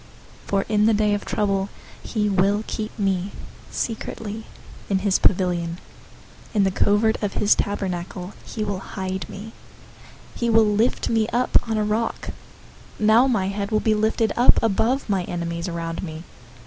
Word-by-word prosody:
027:005 - - -20
For 195 -1 +2
in 210 -1 +3
the 225 - +4
day 210 0 +2
of 205 - -2
trouble 195 -1 0 0.3
he 210 -2 -1
will 200 +2 +2
keep 215 0 -5
me 195 -2 0 0.4
secretly 220 -1 -4 0.4
in 195 - +2
his 190 0 +2
pavilion. 175 -3 +1 0.8
In 205 - +4
the 190 - +2
covert 210 +3 +2
of 205 -2 -1
his 205 - +4
tent 205 0 -1 0.6
he 215 - -4
will 200 -3 -2
hide 190 -1 -5
me. 210 +3 -8 0.8
He 235 - -1
will 225 -1 +6
lift 215 +3 +1
me 225 -2 +2
up 245 +2 -1
on 220 - 0
a 215 - +1
rock. 215 +2 -1 0.7
027:006 215 - 0
Now 225 +5 +6
my 200 -7 +1
head 200 0 -3
will 215 - +2
be 220 - +2
lifted 220 +1 +1
up 245 - +6
above 225 +5 +1
my 195 -4 +1
enemies 170 0 -3
around 165 -1 -4
me. 160 -2 -6
205 Hz, 165 wpm, -23 LUFS, 190-220 Hz, 0.8 s, will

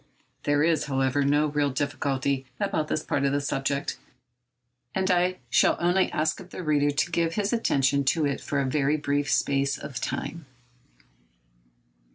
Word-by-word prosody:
There 145 0 +3
is, 160 -2 +2
however, 135 0 +1
no 145 +2 +3
real 145 -1 0
difficulty 140 -1 -1
about 155 -1 -1
this 155 - -1
part 140 - -1
of 140 - +2
the 145 - +2
subject, 140 0 -2 1.0
and 190 0 +1
I 180 +1 +2
shall 115 - +4
only 180 +2 +2
ask 155 +1 0
of 185 -1 -11
the 185 - -7
reader 145 -2 +2
to 155 +4 0
give 165 0 0
his 205 +1 0
attention 140 - +2
to 155 +3 +2
it 140 -1 -1
for 140 - -2
a 140 - +1
very 145 +2 +1
brief 145 0 -1
space 140 -1 +1
of 130 - -7
time. 165 -4 -4
145 Hz, 165 wpm, -26 LUFS, 140-160 Hz, 1.0 s, shall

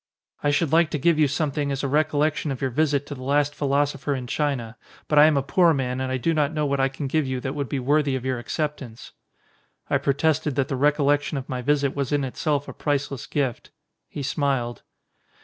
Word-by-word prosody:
"I 145 - +1
should 145 +1 +1
like 165 0 +4
to - - -2
give 160 +2 +2
you 150 - +5
something 145 0 -1
as 135 0 -3
a - - +1
recol 150 +1 +1
lection 155 0 0
of 135 - -3
your 135 -1 -1
visit 145 +1 +1
to 145 - -6
the 130 - -9
last 145 +2 +1
philosopher 145 0 0
in 130 -2 -5
China, 125 -4 -2 0.3
but 150 - +4
I 150 - +9
am 155 -2 +3
a 135 - +1
poor 170 +3 +3
man 130 -1 -2
and 130 0 -2
I 130 - 0
do 165 +6 0
not 150 -2 +1
know 150 -1 0
what 140 -1 0
I 135 - +3
can 135 +2 -6
give 145 +1 0
you 130 -1 -2
that 130 - -3
would 140 -3 -3
be 140 - -2
worthy 140 +1 +1
of 130 -1 -4
your 130 -2 -1
acceptance." 135 -3 -5 0.8
I - - +3
protested 145 0 +1
that 135 -1 0
the 135 - -1
recollection 145 +1 +2
of 135 - -5
my 125 -1 -3
visit 140 +1 +1
was 140 -1 -2
in 145 -1 +1
itself 145 +2 -1
a - - -7
priceless 140 -3 -2
gift. 135 -5 -2 0.4
He 145 - -6
smiled. 135 -4 -1
140 Hz, 230 wpm, -24 LUFS, 135-150 Hz, 0.8 s, I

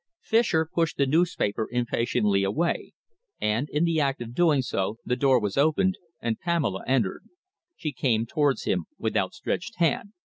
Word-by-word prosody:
Fischer 220 -8 +2
pushed 165 0 -1
the 140 - +3
newspaper 145 - +1
impatiently 115 -4 +1
away, 130 - -1 0.5
and, 115 +7 0
in 150 +3 0
the 165 -2 +2
act 140 -1 0
of 120 -1 -7
doing 150 -3 +3
so, 105 -2 -2
the 125 - 0
door 135 -1 +4
was 105 +2 -1
opened 185 +6 +2 0.2
and 115 -2 -2
Pamela 155 - -1
entered. 125 -8 0 0.5
She 155 - -4
came 115 -6 +1
towards 145 +2 +1
him 90 -3 0
with 110 -1 -2
outstretched 175 - -2
hand. 175 +4 0
135 Hz, 155 wpm, -26 LUFS, 110-165 Hz, 0.5 s, door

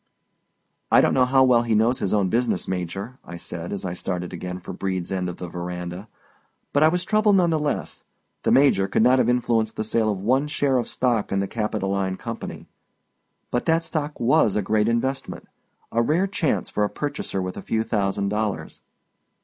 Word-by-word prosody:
"I - - +7
don't - - +3
know 130 -1 +4
how 135 +1 +5
well 125 -2 +5
he 115 -2 0
knows 115 +4 +2
his 95 - -1
own 100 -3 +2
business, 115 -3 0
Major," 95 +7 -4
I 85 - -8
said 85 0 -6
as 100 -1 -4
I 90 - -2
started 90 -1 -4
again 90 +1 -5
for 90 - -8
Brede's 95 -2 -3
end 90 -1 -1
of 90 - -7
the 90 - -6
veranda. 90 +2 -6 0.7
But 145 - +3
I 155 - +7
was 180 +2 0
troubled 215 0 +3
none 175 -3 +3
the 160 - +1
less. 150 -1 -3 0.4
The - - +1
Major 135 -8 +4
could 110 - +2
not 130 +2 +5
have 120 - +3
influenced 115 -3 +1
the - - -2
sale 110 0 +1
of 100 - -2
one 130 +9 +1
share 140 -3 +1
of 120 - -3
stock 120 -4 0
in 95 - +1
the 100 - -1
Capitoline 100 -3 -2
Company. 115 -1 -7 0.8
But 120 - -1
that 165 0 +2
stock 150 -2 -3
was 120 -3 +3
a 105 - +1
great 110 +2 +2
investment; 130 +4 -2 0.4
a 115 - +2
rare 160 +10 +2
chance 190 -6 -1
for 105 - -1
a 105 - +1
purchaser 145 -9 -3
with 90 0 -3
a - - -6
few 110 0 -1
thousand 100 -3 0
dollars. 105 -6 -3
110 Hz, 200 wpm, -24 LUFS, 95-130 Hz, 0.8 s, I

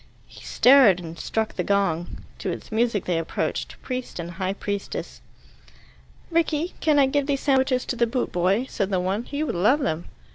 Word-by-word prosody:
He - - -15
stared, 250 -8 +6
and 165 -2 -8
struck 220 -1 -2
the 180 - -2
gong. 180 -4 -1 0.2
To - - -3
its - - -6
music 220 -2 +1
they 175 -2 0
approached, 165 - -3
priest 255 -1 -5
and 170 0 -5
high 190 +2 -2
priestess. 200 0 -5 1.1
"Rickie, 330 0 0
can 305 -2 +3
I 280 - +6
give 285 +1 0
these 275 -2 0
sandwiches 265 -2 +2
to - - -3
the 235 0 +2
boot 250 +2 -2
boy?" 190 +7 +1
said 200 -6 -2
the 190 -2 +1
one. 195 +6 -1
"He 290 +1 -3
would 310 - -2
love 215 - +3
them." 160 - -2
220 Hz, 185 wpm, -24 LUFS, 180-270 Hz, 1.1 s, stared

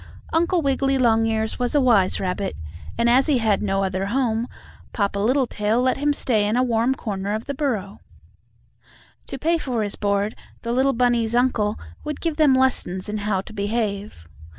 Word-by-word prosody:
Uncle 340 +1 +2
Wiggily 270 0 +1
Longears 225 -2 +1
was 245 +3 0
a - - +5
wise 225 -8 +3
rabbit, 190 +1 -2 0.4
and 235 0 +2
as 255 +3 +4
he 290 -4 +3
had 220 -4 +1
no 195 -1 0
other 190 0 -2
home, 235 -1 0 0.5
Papa 200 -2 -1
Littletail 230 -1 +1
let 255 +1 +1
him 290 +1 +1
stay 220 -7 +1
in 215 +3 0
a 250 - +3
warm 240 +1 +1
corner 205 -4 -3
of 220 - -5
the 280 - -3
burrow. 225 -9 -3 1.3
To - - -5
pay 330 +5 +1
for 245 -7 -2
his 205 - -3
board 200 +1 0 0.3
the 235 - -2
little 265 +2 +2
bunnies' 235 -2 +1
uncle 240 -4 +1 0.3
would 300 -1 -4
give 325 -3 -2
them 295 -4 +5
lessons 220 -7 0
in 210 0 -3
how 200 -2 0
to 200 - -12
behave. 205 - -3
230 Hz, 175 wpm, -22 LUFS, 205-260 Hz, 1.3 s, a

